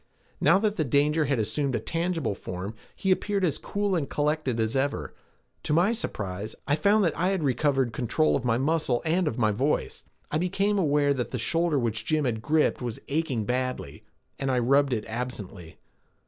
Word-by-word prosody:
Now - - +5
that 210 +1 0
the 155 - +2
danger 150 +3 +2
had 140 -3 +1
assumed 130 +5 0
a - - 0
tangible 165 - -1
form, 95 +2 -6 0.2
he 190 - 0
appeared 200 0 +1
as 155 -5 -1
cool 205 -1 -1
and 155 -5 -1
collected 150 -5 0
as 110 +3 0
ever, 140 +1 -1 0.5
to - - -1
my 180 +8 +4
surprise, 105 - -4
I 145 - +3
found 200 +7 +3
that 165 -5 +1
I 180 - +1
had 190 -4 0
recovered 135 -2 +1
control 125 +7 +1
of 135 - -1
my 120 -2 +2
muscle 135 -3 0
and 170 +2 +2
of 120 - -2
my 110 -3 +3
voice. 130 +8 -1 0.3
I 155 - +1
became 195 +3 +1
aware 145 -4 +3
that 125 -4 -3
the 125 - -3
shoulder 165 +5 +1
which 110 -3 -1
Jim 155 +4 +1
had 110 -3 -1
gripped 150 +2 +2
was 120 -3 -4
aching 140 -7 -1
badly, 125 - -3 0.4
and 135 - -1
I 130 - +2
rubbed 135 +3 +3
it 110 -4 -1
absently. 110 -7 -6
140 Hz, 190 wpm, -27 LUFS, 120-165 Hz, 0.5 s, Now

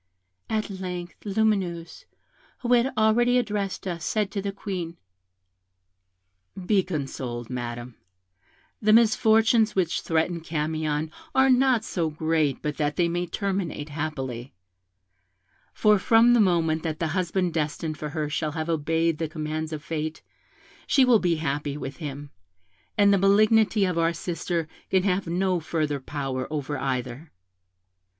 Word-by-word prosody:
At 215 -2 -1
length 180 -2 -6
Lumineuse, 195 -5 -1 0.6
who 245 0 +2
had 245 +2 +3
already 240 +3 +4
addressed 205 -6 -2
us, 170 -3 -4
said 210 -3 0
to 200 - -2
the 200 0 -3
Queen, 185 -4 -5 1.6
'Be 195 +1 +2
consoled, 130 -8 -5
Madam; 120 0 -5 0.9
the 215 0 +4
misfortunes 220 0 +4
which 180 -3 +1
threaten 165 +1 0
Camion 155 -1 -2 0.2
are 265 0 +5
not 255 -3 +3
so 170 -7 -1
great 155 -2 0
but 150 -1 -2
that 150 -1 0
they 175 -2 +2
may 175 +1 -2
terminate 185 -5 -3
happily; 135 - -5 1.2
for 210 -2 +3
from 230 +4 +5
the 240 - +5
moment 165 -4 +2
that 160 -2 -3
the 165 - -1
husband 180 +1 0
destined 155 0 -2
for 150 +1 -5
her 155 0 -2
shall 150 0 -2
have 160 +1 -3
obeyed 160 0 0
the 160 -2 -2
commands 155 0 -4
of 155 -2 -5
fate, 155 0 -4 0.6
she 270 -2 +5
will 240 -3 +5
be 175 -3 +1
happy 145 -2 -2
with 135 -2 -6
him, 145 -2 -7 0.7
and 200 -1 +5
the 200 - +3
malignity 210 +1 +4
of 180 -2 -1
our 165 0 +2
sister 170 0 -3 0.2
can 190 -1 +2
have 190 -1 0
no 180 +1 +1
further 155 -3 -2
power 135 -2 -4
over 150 -1 -3
either. 130 +3 -3
170 Hz, 140 wpm, -25 LUFS, 150-200 Hz, 1.6 s, are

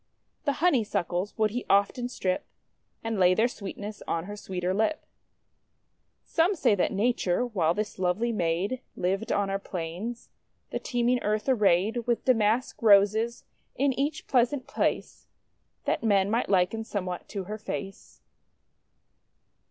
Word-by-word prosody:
The 285 - +2
Honeysuckles 210 - +1
would 215 -1 +2
he 245 +3 -3
often 205 +5 +2
strip, 185 -7 -1 0.6
and 225 -2 -2
lay 185 0 +5
their 225 +4 +3
sweetness 205 -2 -7
on 165 - -1
her 205 +3 -7
sweeter 185 -2 -3
lip. 220 +10 0 1.2
Some 340 +5 +2
say 305 - +3
that 195 - +1
Nature, 210 0 +1
while 175 -8 +1
this 210 -2 -3
lovely 190 +6 +1
maid 190 +5 -1
lived 195 +5 -1
on 200 -1 +1
our 195 - -1
plains, 190 +6 -6 0.4
the - - -2
teeming 245 0 0
earth 215 +3 -1
arrayed 220 -1 +2
with 240 -1 0
Damask 235 0 +2
Roses 220 +2 +4 0.3
in 275 +1 +2
each 280 +4 -2
pleasant 255 +1 +1
place, 280 - -2 0.6
that - - 0
men 200 -2 +3
might 230 +2 0
liken 195 +3 +2
somewhat 185 -5 -4
to 200 -2 -4
her 210 +4 -6
face. 195 -2 -7
215 Hz, 135 wpm, -27 LUFS, 190-240 Hz, 1.2 s, lay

